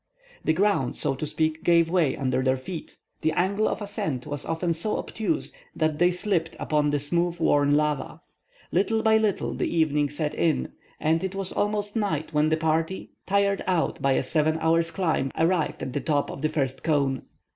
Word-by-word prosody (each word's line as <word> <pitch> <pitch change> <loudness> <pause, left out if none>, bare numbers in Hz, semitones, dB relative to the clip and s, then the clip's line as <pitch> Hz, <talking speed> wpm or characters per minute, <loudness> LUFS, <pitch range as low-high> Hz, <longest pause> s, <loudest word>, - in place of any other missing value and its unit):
The 155 - +2
ground, 185 -9 +1
so 135 - 0
to 145 +3 -4
speak, 155 +1 -1
gave 170 -1 +4
way 165 -6 +1
under 130 -1 0
their 130 0 +2
feet. 165 +6 -8 0.2
The 160 0 +1
angle 200 +6 +1
of - - -2
ascent 155 -11 -3
was 145 -1 -5
often 165 +1 -1
so 170 +7 -2
obtuse 225 +9 -2 0.2
that 155 -2 0
they 175 +1 +5
slipped 180 -3 0
upon 150 -1 +1
the 145 0 +1
smooth 170 +4 0
worn 145 -3 +3
lava. 150 -2 -1 0.5
Little 220 +5 +1
by 220 0 +5
little 215 -3 0
the - - -1
evening 150 -3 +1
set 150 +1 -2
in, 165 -2 0 0.3
and 160 +2 +1
it 190 0 -3
was 195 -1 -3
almost 205 0 -1
night 160 -8 -1
when 150 +1 +3
the 160 - +2
party, 160 +3 -1 0.2
tired 200 0 +2
out 180 -3 0
by 135 0 +3
a - - +1
seven 155 +3 +1
hours' 165 +1 +2
climb, 160 -7 0
arrived 165 -1 +1
at 130 - -4
the 145 - -1
top 145 -3 0
of - - -8
the 155 - +1
first 135 -4 -1
cone. 140 -4 +1
160 Hz, 190 wpm, -26 LUFS, 145-185 Hz, 0.5 s, they